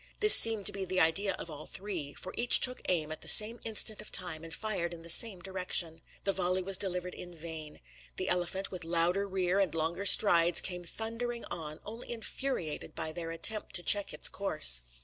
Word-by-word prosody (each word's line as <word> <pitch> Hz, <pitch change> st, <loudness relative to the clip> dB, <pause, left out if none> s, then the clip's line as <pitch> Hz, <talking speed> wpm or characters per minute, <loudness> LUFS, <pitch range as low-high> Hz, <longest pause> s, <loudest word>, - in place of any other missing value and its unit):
This 425 Hz, 0 st, +10 dB
seemed 225 Hz, -3 st, +8 dB
to -, -, +5 dB
be 195 Hz, -, -5 dB
the 185 Hz, 0 st, -2 dB
idea 180 Hz, +5 st, +2 dB
of 170 Hz, -, -7 dB
all 150 Hz, 0 st, -10 dB
three; 180 Hz, -8 st, -7 dB
for 185 Hz, -, -8 dB
each 240 Hz, +1 st, +5 dB
took 255 Hz, 0 st, +1 dB
aim 160 Hz, -4 st, -2 dB
at 155 Hz, -, -8 dB
the -, -, -10 dB
same 225 Hz, +2 st, +6 dB
instant 215 Hz, -1 st, +2 dB
of 215 Hz, -, -12 dB
time 170 Hz, -4 st, -3 dB
and 165 Hz, -, -11 dB
fired 175 Hz, -2 st, -4 dB
in 165 Hz, -, -14 dB
the 170 Hz, -, -1 dB
same 195 Hz, 0 st, +4 dB
direction. 180 Hz, -3 st, -3 dB, 0.2 s
The 195 Hz, -, -1 dB
volley 185 Hz, 0 st, -2 dB
was 195 Hz, +1 st, -1 dB
delivered 180 Hz, -2 st, -1 dB
in 175 Hz, -1 st, -11 dB
vain. 160 Hz, -2 st, -10 dB, 0.4 s
The -, -, -4 dB
elephant, 180 Hz, +2 st, -3 dB
with 185 Hz, -2 st, -8 dB
louder 175 Hz, +4 st, -1 dB
rear 190 Hz, 0 st, -2 dB
and 190 Hz, -5 st, -1 dB
longer 165 Hz, +5 st, -3 dB
strides, 175 Hz, -4 st, +3 dB
came 180 Hz, -1 st, -3 dB
thundering 230 Hz, +5 st, -5 dB
on, 155 Hz, -2 st, -8 dB
only 225 Hz, +4 st, -10 dB
infuriated 230 Hz, -, -5 dB
by 155 Hz, -, -5 dB
their 165 Hz, 0 st, -7 dB
attempt 185 Hz, +6 st, 0 dB
to 175 Hz, -, +2 dB
check 205 Hz, +1 st, +2 dB
its -, -, +1 dB
course. 155 Hz, -, 0 dB
180 Hz, 205 wpm, -29 LUFS, 165-205 Hz, 0.4 s, This